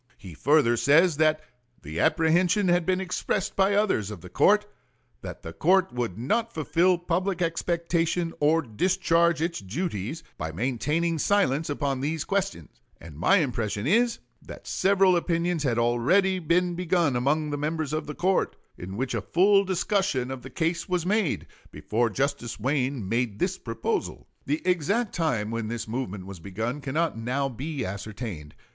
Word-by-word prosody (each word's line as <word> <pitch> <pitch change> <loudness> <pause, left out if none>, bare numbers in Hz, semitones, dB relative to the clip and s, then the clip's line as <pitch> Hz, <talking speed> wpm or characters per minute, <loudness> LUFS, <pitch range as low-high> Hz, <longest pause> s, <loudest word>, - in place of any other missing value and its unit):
He 95 -4 -11
further 135 - +3
says 155 +5 +4
that 155 0 +3 0.4
"the 80 +3 -5
apprehension 175 +5 +3
had 175 -1 +2
been 185 0 +2
expressed 190 +1 -2
by 195 +1 +3
others 195 - +1
of 105 - -8
the 90 - -12
court, 210 +1 +4 0.6
that - - -8
the 80 - -7
court 185 - +2
would 120 -7 -3
not 225 - 0
fulfill 170 +2 +2
public 175 +2 -1
expectation 170 0 0
or 160 +2 +3
discharge 170 - +1
its 170 0 -2
duties 130 - -4 0.2
by 80 - -3
maintaining 150 - -1
silence 160 -6 +1
upon 140 -2 -1
these 155 +2 -1
questions; 180 - -3 0.2
and 80 -3 -12
my 185 - +4
impression 115 - -1
is, 230 - +3 0.2
that - - -11
several 195 -1 +3
opinions 170 -1 0
had 125 -5 0
already 130 +12 +2
been 175 +2 +1
begun 170 -5 +1
among 150 +5 0
the - - -1
members 155 0 -2
of 155 -1 -2
the 150 - -6
court, 190 +1 +1 0.2
in 95 +3 -7
which 130 +1 -2
a 115 - -1
full 195 - +4
discussion 190 -8 0
of 130 -1 -6
the 130 - -9
case 165 +6 -2
was 180 -2 0
made, 205 -3 0 0.2
before 115 +2 -1
Justice 120 -2 -2
Wayne 130 -2 -1
made 115 -1 -1
this 185 - -1
proposal." 115 -1 -3 0.2
The 150 +3 -1
exact 185 +6 +1
time 125 - -1
when 115 -1 -3
this 115 0 -4
movement 105 -5 -4
was 95 -2 -9
begun 110 - -4
cannot 145 -2 -1
now 130 +4 -1
be 135 +2 -4
ascertained. 100 - -6
155 Hz, 160 wpm, -26 LUFS, 120-180 Hz, 0.6 s, says